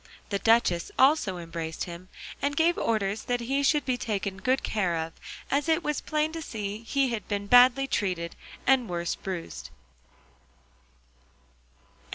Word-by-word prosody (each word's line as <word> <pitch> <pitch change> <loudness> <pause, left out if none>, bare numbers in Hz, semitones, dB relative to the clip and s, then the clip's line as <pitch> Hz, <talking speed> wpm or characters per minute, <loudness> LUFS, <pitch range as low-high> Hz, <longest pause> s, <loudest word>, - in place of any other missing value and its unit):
The 200 - -1
duchess 210 -6 +3
also 265 - +4
embraced 165 -1 -5
him, 175 +1 -8 0.3
and 285 +1 -1
gave 335 +1 +4
orders 215 -2 -1
that 245 0 0
he 270 +4 0
should 290 0 +2
be 250 -2 0
taken 200 -3 -2
good 255 +6 0
care 190 -6 0
of, 160 0 -4 0.4
as 290 +4 +1
it 320 +1 +2
was 300 -1 -1
plain 305 0 0
to 325 0 -5
see 210 -7 -5
he 270 +3 +1
had 230 -3 -4
been 205 -1 -2
badly 245 +4 +6
treated 180 -9 -2 0.3
and 255 -3 +3
worse 170 -1 -1
bruised. 185 -3 -6
225 Hz, 150 wpm, -27 LUFS, 185-270 Hz, 0.4 s, badly